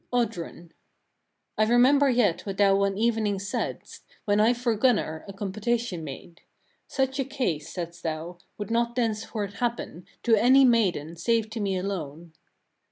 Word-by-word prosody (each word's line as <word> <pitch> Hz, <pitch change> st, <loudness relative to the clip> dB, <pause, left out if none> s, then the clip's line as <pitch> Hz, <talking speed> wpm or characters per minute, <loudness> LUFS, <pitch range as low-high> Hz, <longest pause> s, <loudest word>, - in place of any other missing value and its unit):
Oddrun. 180 Hz, -8 st, -3 dB
13. -, -, -34 dB, 0.9 s
I 215 Hz, -, +5 dB
remember 260 Hz, +5 st, +5 dB
yet 235 Hz, -9 st, +2 dB
what 195 Hz, -2 st, -5 dB
thou 200 Hz, -1 st, +5 dB
one 195 Hz, 0 st, +1 dB
evening 220 Hz, -2 st, +1 dB
saidst, 200 Hz, +1 st, -5 dB, 0.2 s
when 205 Hz, 0 st, +2 dB
I 220 Hz, +3 st, +5 dB
for 240 Hz, -1 st, 0 dB
Gunnar, 210 Hz, -9 st, +1 dB
a -, -, -6 dB
compotation 205 Hz, -1 st, -2 dB
made. 155 Hz, +3 st, -9 dB, 0.5 s
Such 265 Hz, 0 st, -1 dB
a -, -, +2 dB
case, 250 Hz, -, -3 dB
saidst 170 Hz, -1 st, -6 dB
thou, 165 Hz, +2 st, -5 dB, 0.2 s
would 205 Hz, 0 st, -5 dB
not 235 Hz, +1 st, 0 dB
thenceforth 215 Hz, -3 st, -2 dB
happen, 235 Hz, -8 st, -3 dB, 0.2 s
to 230 Hz, -2 st, +5 dB
any 260 Hz, +5 st, +6 dB
maiden, 180 Hz, -, +1 dB
save 225 Hz, +4 st, 0 dB
to 225 Hz, -, -5 dB
me 195 Hz, -2 st, -1 dB
alone." 170 Hz, -4 st, -5 dB
210 Hz, 155 wpm, -26 LUFS, 180-235 Hz, 0.9 s, any